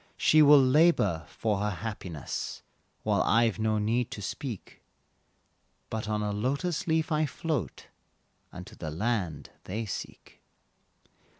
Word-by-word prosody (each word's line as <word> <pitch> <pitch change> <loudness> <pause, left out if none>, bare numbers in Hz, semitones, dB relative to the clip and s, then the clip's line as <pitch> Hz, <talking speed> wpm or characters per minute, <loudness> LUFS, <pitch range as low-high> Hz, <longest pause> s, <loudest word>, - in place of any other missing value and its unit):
She 155 - +5
will 145 0 +8
labor 130 - +3
for 105 -3 -1
her 105 +1 0
happiness 90 -6 -5 0.4
While - - +2
I've 115 -1 +2
no 110 0 +1
need 115 +3 0
to 105 - -7
speak, 115 +1 -6 1.1
But 110 -1 -3
on 105 0 0
a 105 - -1
lotus 140 - -1
leaf 160 0 +1
I 155 0 +2
float, 155 -1 -3 0.7
Unto 90 0 -10
the 80 - -6
land 95 -1 -2
they 110 +4 -3
seek. 100 - -8
110 Hz, 125 wpm, -29 LUFS, 105-140 Hz, 1.1 s, will